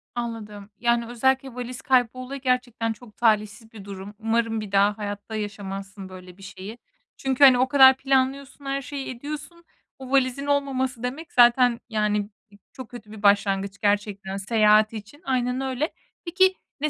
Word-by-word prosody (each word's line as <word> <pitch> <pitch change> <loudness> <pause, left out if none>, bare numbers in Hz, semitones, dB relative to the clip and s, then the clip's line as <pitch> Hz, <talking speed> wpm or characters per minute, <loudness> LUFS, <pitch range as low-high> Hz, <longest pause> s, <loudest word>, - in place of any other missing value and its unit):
Anladım. 215 -4 -6
Yani, 235 0 +1
özellikle 265 +2 0
valiz 250 0 -6
kaybı 250 -3 +3
olayı 255 +2 -7
gerçekten 250 -3 -1
çok 220 -2 -17
talihsiz 220 0 0
bir 210 -3 -12
durum. 200 0 -8
Umarım 225 0 0
bir 205 -2 -8
daha 200 +1 +3
hayatta 205 +1 -6
yaşamazsın 195 -2 -6
böyle 185 0 -12
bir 195 - -15
şeyi. 205 +3 -9 0.4
Çünkü, 265 +1 0
hani, 260 -2 +8
o 255 - +3
kadar 265 -1 +7
planlıyorsun, 270 +1 -1
her 275 0 -2
şeyi 275 0 -6
ediyorsun. 295 +6 -7 0.4
Bu 260 0 -9
valizin 270 0 +1
olmaması 265 -4 -1
demek 290 +6 -5
zaten 240 0 +5
yani 210 -1 0 0.3
b 200 - -18 0.2
çok 260 -3 -9
kötü 225 -4 -11
bir 215 -1 -11
başlangıç 200 -1 +2
gerçekten 205 -1 -1
seyahat 215 +1 +3
için. 220 - -10
Aynen 255 0 0
öyle. 265 +4 -2 0.3
Peki 375 +2 +3 0.3
ne 305 - +1
235 Hz, 160 wpm, -24 LUFS, 205-265 Hz, 0.4 s, hani